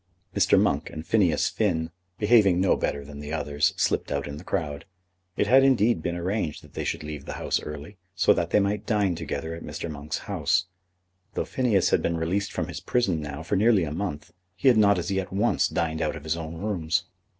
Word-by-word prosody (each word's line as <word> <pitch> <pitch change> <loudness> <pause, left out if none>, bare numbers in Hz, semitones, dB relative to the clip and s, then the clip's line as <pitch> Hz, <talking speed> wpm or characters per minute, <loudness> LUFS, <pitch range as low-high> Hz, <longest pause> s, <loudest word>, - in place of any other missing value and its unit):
Mr. - - +4
Monk - - +1
and 80 +1 -7
Phineas 95 -8 +2
Finn, 85 -6 0 0.3
behaving 105 -5 +4
no 95 - +3
better 70 -1 -2
than 70 0 -10
the 75 0 -7
others, 75 -2 +1
slipped - - 0
out 70 -1 -1
in 70 0 -6
the 80 - -10
crowd. 75 -5 -3 0.5
It - - +2
had 130 +5 +6
indeed 120 -8 +3
been 85 +2 -2
arranged 85 -2 -2
that - - -17
they - - -3
should - - -3
leave 75 -2 -7
the - - -5
House - - -1
early, 75 +6 -8 0.2
so - - +5
that 85 0 -1
they 105 - +4
might 100 +1 -1
dine 105 -4 +2
together 80 -1 -4
at 85 - -7
Mr. 85 - -5
Monk's 75 0 -4
house. - - +1 0.7
Though - - -1
Phineas 115 -8 +1
had - - +3
been 85 - 0
released 90 +5 -1
from 85 -2 -2
his 90 -1 -6
prison 95 -3 0
now 75 +1 -6
for 80 - -1
nearly 105 -2 +4
a 75 - -3
month, 85 -3 -4 0.2
he 95 +8 +4
had 120 - +5
not 100 -2 +5
as 90 +1 -2
yet 95 -1 -2
once 105 +5 +2
dined 80 -1 -2
out - - -1
of 80 - -9
his 80 +1 -1
own 80 0 -6
rooms. 90 -4 -1
85 Hz, 215 wpm, -26 LUFS, 80-100 Hz, 0.7 s, had